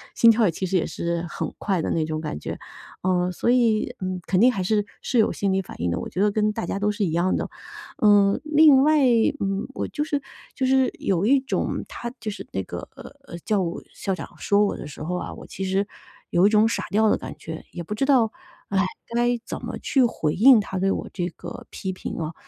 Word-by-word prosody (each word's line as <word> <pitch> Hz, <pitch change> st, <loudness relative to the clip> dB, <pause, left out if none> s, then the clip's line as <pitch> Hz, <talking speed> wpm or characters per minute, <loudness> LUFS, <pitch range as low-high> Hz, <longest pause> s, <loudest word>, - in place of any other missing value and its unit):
心 230 Hz, -, +6 dB
跳 225 Hz, -4 st, +4 dB
其 175 Hz, +3 st, -3 dB
实 185 Hz, -, -2 dB
也 180 Hz, -, +2 dB
是 170 Hz, 0 st, -3 dB
很 -, -, -4 dB
快 190 Hz, -5 st, 0 dB
的 -, -, -2 dB
那 160 Hz, -, +1 dB
种 155 Hz, 0 st, -3 dB
感 155 Hz, -, -4 dB
觉。 -, -, -6 dB, 0.4 s
呃， 180 Hz, -1 st, +1 dB
所 210 Hz, -, -1 dB
以， 240 Hz, -1 st, +2 dB
嗯， 185 Hz, 0 st, -2 dB
肯 185 Hz, -, +2 dB
定 250 Hz, -, +7 dB
还 200 Hz, -6 st, -3 dB
是 205 Hz, +2 st, +1 dB, 0.2 s
是 250 Hz, -, -1 dB
有 220 Hz, -, +4 dB
心 195 Hz, -2 st, -1 dB
理 195 Hz, -, +1 dB
反 180 Hz, -, -11 dB
应 85 Hz, -, 0 dB
的， 85 Hz, -, -1 dB
我 -, -, -5 dB
觉 -, -, -5 dB
得 210 Hz, -, +4 dB
跟 215 Hz, 0 st, +1 dB
大 210 Hz, -, -4 dB
家 185 Hz, -, -3 dB
都 210 Hz, +1 st, +1 dB
是 205 Hz, -1 st, -1 dB
一 160 Hz, -, -1 dB
样 175 Hz, +3 st, +1 dB
的。 -, -, -3 dB, 0.5 s
呃， 205 Hz, -2 st, +5 dB
另 300 Hz, -3 st, +6 dB
外， 305 Hz, +1 st, +4 dB, 0.4 s
嗯， 195 Hz, +1 st, -1 dB
我 -, -, -3 dB
就 295 Hz, -, -2 dB
是 290 Hz, -2 st, -2 dB, 0.3 s
就 265 Hz, -, -1 dB
是 265 Hz, 0 st, +3 dB
有 190 Hz, 0 st, 0 dB
一 270 Hz, +5 st, +5 dB
种 265 Hz, -, -2 dB
他 240 Hz, 0 st, -6 dB
就 220 Hz, -2 st, -4 dB
是 205 Hz, -, -7 dB
那 -, -, -2 dB
个， -, -, -7 dB
呃， 275 Hz, -11 st, -11 dB
教 210 Hz, -3 st, +2 dB
务 170 Hz, -1 st, -3 dB
校 195 Hz, -, -2 dB
长 160 Hz, -6 st, -6 dB
说 205 Hz, +1 st, +3 dB
我 -, -, -1 dB
的 -, -, -7 dB
时 145 Hz, -, -10 dB
候 180 Hz, +3 st, -2 dB
啊， 180 Hz, -, -4 dB
我 -, -, -11 dB
其 195 Hz, -, -6 dB
实 195 Hz, +2 st, 0 dB, 0.4 s
有 175 Hz, +2 st, +4 dB
一 -, -, +4 dB
种 215 Hz, +1 st, +4 dB
傻 230 Hz, -, -1 dB
掉 220 Hz, +1 st, +4 dB
的 -, -, +3 dB
感 -, -, -7 dB
觉， 160 Hz, 0 st, -8 dB
也 175 Hz, -, -6 dB
不 205 Hz, -, -5 dB
知 270 Hz, -, 0 dB
道， 245 Hz, -6 st, +4 dB, 0.4 s
唉， 195 Hz, -1 st, +2 dB, 0.3 s
该 240 Hz, 0 st, +2 dB
怎 -, -, -6 dB
么 -, -, -5 dB
去 265 Hz, -2 st, +2 dB
回 155 Hz, -10 st, 0 dB
应 245 Hz, +3 st, +7 dB
他 195 Hz, -2 st, -4 dB
对 195 Hz, +1 st, +2 dB
我 -, -, -3 dB
这 175 Hz, -1 st, -2 dB
个 -, -, -9 dB
批 190 Hz, -1 st, -4 dB
评 -, -, -6 dB
哦。 160 Hz, 0 st, -3 dB
200 Hz, 260 characters per minute, -24 LUFS, 180-235 Hz, 0.5 s, 定